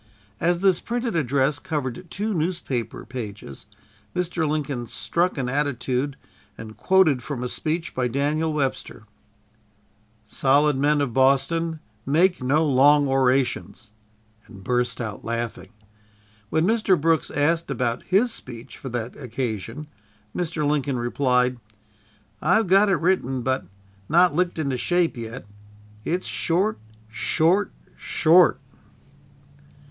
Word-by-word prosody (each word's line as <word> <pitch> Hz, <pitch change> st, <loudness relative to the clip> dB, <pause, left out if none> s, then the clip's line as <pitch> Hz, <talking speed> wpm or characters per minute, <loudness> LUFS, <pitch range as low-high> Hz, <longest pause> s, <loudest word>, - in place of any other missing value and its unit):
As 175 Hz, +1 st, +1 dB
this 190 Hz, -3 st, +4 dB
printed 240 Hz, -3 st, -3 dB
address 140 Hz, -1 st, +1 dB
covered 145 Hz, +3 st, -4 dB
two 210 Hz, +4 st, -2 dB
newspaper 160 Hz, -, -3 dB
pages, 105 Hz, -, -8 dB, 0.5 s
Mr. 175 Hz, -3 st, -1 dB
Lincoln 140 Hz, -5 st, -2 dB
struck 170 Hz, +9 st, -1 dB
an 130 Hz, -2 st, -1 dB
attitude 135 Hz, 0 st, -1 dB, 0.4 s
and 110 Hz, -1 st, -9 dB
quoted 185 Hz, -9 st, +3 dB
from 125 Hz, 0 st, -5 dB
a -, -, -1 dB
speech 160 Hz, +6 st, -3 dB
by 125 Hz, -1 st, 0 dB
Daniel 145 Hz, +5 st, 0 dB
Webster: 135 Hz, -7 st, -3 dB, 1.2 s
"Solid 140 Hz, +6 st, +2 dB
men 145 Hz, +2 st, +2 dB
of 130 Hz, -5 st, -2 dB
Boston, 155 Hz, +5 st, +2 dB, 0.2 s
make 170 Hz, +5 st, +2 dB
no 145 Hz, +5 st, +2 dB
long 145 Hz, +1 st, +5 dB
orations!" 130 Hz, -4 st, 0 dB, 0.6 s
and 100 Hz, -4 st, -13 dB
burst 125 Hz, +2 st, 0 dB
out 110 Hz, -4 st, -5 dB
laughing. 115 Hz, -4 st, -4 dB, 0.8 s
When 160 Hz, +5 st, +1 dB
Mr. 210 Hz, -4 st, +2 dB
Brooks 165 Hz, +1 st, +1 dB
asked 165 Hz, +3 st, 0 dB
about 120 Hz, -3 st, -1 dB
his 220 Hz, +6 st, +2 dB
speech 120 Hz, -, -9 dB
for 135 Hz, -, -6 dB
that 120 Hz, 0 st, -4 dB
occasion, 120 Hz, 0 st, -4 dB, 0.5 s
Mr. 165 Hz, -3 st, -2 dB
Lincoln 140 Hz, -3 st, 0 dB
replied: 125 Hz, 0 st, +1 dB, 0.8 s
"I've 190 Hz, +8 st, +3 dB
got 195 Hz, +3 st, +4 dB
it 195 Hz, -, +4 dB
written, 135 Hz, -8 st, 0 dB
but 130 Hz, -4 st, -1 dB, 0.4 s
not 175 Hz, 0 st, +5 dB
licked 175 Hz, +2 st, 0 dB
into 140 Hz, -5 st, -1 dB
shape 175 Hz, +3 st, +1 dB
yet. 115 Hz, 0 st, -7 dB, 0.6 s
It's 180 Hz, +3 st, -2 dB
short, 190 Hz, +6 st, 0 dB, 0.3 s
short, 165 Hz, -, +1 dB, 0.3 s
SHORT!" 165 Hz, -4 st, +4 dB
145 Hz, 120 wpm, -24 LUFS, 125-170 Hz, 1.2 s, long